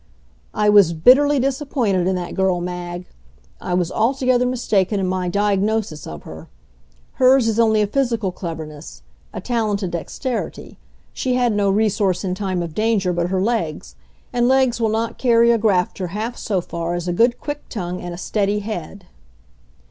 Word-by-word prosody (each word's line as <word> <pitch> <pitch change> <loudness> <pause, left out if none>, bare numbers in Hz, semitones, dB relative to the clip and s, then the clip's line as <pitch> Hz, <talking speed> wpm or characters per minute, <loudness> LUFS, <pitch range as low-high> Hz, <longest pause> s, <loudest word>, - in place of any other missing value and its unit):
I 210 - +1
was 200 -5 +6
bitterly 270 - +5
disappointed 255 - 0
in 190 - +1
that 175 -1 -4
girl, 190 -2 +1
Mag! 175 0 -5 0.6
I 180 - -2
was 180 -1 0
altogether 250 +1 +1
mistaken 210 -5 0
in 190 - 0
my 185 -1 -1
diagnosis 200 -3 0
of 75 -1 -8
her. 80 0 -10 0.7
Hers 255 -2 +5
is 225 0 0
only 220 -2 +4
a - - +2
physical 230 -3 -1
cleverness, 160 -4 -8 0.3
a - - -6
talented 210 -6 -1
dexterity. 230 - -5 0.3
She 255 -1 -1
had 245 -3 +2
no 205 -1 +1
resource 200 -2 +1
in 185 -2 -1
time 185 -2 -2
of 165 -2 -6
danger 210 -3 +1
but 175 0 0
her 190 0 0
legs. 200 -9 -2 0.4
And 240 0 +2
legs 260 -2 +2
will 225 - +2
not 225 +1 -2
carry 235 -2 +4
a 230 - +2
grafter 190 -3 0
half 215 +7 -4
so 195 -4 -2
far 170 0 -4
as 175 0 -4
a 175 - 0
good, 235 +6 +2
quick 290 -1 -6
tongue 180 -4 -4
and 175 - -6
a 175 - -7
steady 205 +2 -1
head. 195 -2 -6
205 Hz, 170 wpm, -20 LUFS, 180-235 Hz, 0.7 s, was